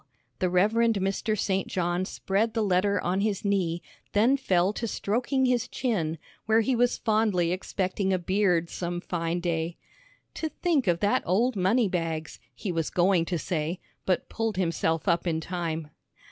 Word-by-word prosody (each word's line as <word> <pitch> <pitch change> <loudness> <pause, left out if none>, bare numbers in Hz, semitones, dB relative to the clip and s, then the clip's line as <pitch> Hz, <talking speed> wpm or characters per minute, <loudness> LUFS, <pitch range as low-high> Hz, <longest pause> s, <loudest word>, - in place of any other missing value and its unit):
The 185 - +1
Rev. 180 +4 +3
Mr. 215 -2 +1
St. 190 -1 0
John 175 0 -1
spread 210 +5 -1
the 225 - +2
letter 200 +1 +2
on 185 +2 0
his 205 -1 -1
knee, 180 -4 0 0.3
then 230 +6 +4
fell 190 -7 +2
to 230 - -3
stroking 250 +6 0
his 250 -1 +1
chin, 170 -11 -1 0.3
where 220 +1 +5
he 250 +3 +1
was 245 +1 +2
fondly 215 -6 +1
expecting 190 +1 -1
a 185 - +3
beard 180 -2 +1
some 175 0 -4
fine 170 -1 -2
day. 170 -1 -2 0.6
"To 320 - -3
think 310 - 0
of 170 -1 +2
that 205 0 +2
old 230 +8 +1
money 205 +5 +3
bags," 165 -3 -3 0.2
he 200 - -3
was 165 -2 -1
going 180 -1 +3
to 175 0 -1
say, 165 +2 -2 0.3
but 185 -2 +1
pulled 225 -3 -2
himself 165 -1 0
up 170 0 +2
in 160 -2 +1
time. 165 -3 -4
190 Hz, 165 wpm, -27 LUFS, 175-215 Hz, 0.6 s, where